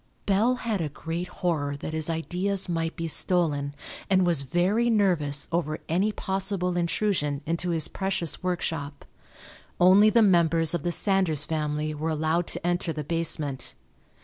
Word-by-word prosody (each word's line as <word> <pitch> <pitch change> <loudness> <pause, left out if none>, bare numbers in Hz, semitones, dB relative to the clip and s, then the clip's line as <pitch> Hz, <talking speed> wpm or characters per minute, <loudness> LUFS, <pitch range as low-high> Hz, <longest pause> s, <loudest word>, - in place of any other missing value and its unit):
Bell 215 +6 +3
had 225 -6 -2
a 155 - -2
great 165 +4 -5
horror 150 -6 -2
that 155 - -6
his 160 0 0
ideas 180 +4 -2
might 165 -1 -2
be 165 -2 -3
stolen 150 -4 +1 0.3
and 190 -1 +4
was 170 -5 +1
very 180 - +1
nervous 175 -10 +1
over 155 -2 -1
any 190 +6 +1
possible 190 -2 -1
intrusion 170 -5 0
into 170 +3 -1
his 165 -3 +1
precious 190 -4 -2
workshop. 160 -5 -3 0.7
Only 190 +4 +7
the 230 +1 +4
members 170 -4 +3
of 175 - -1
the 175 - -1
Sanders 180 -6 +2
family 155 -1 -2
were 155 +2 -3
allowed 160 +2 0
to - - -4
enter 175 -1 +1
the 155 -1 -4
basement. 150 -4 -2
170 Hz, 150 wpm, -26 LUFS, 155-185 Hz, 0.7 s, Only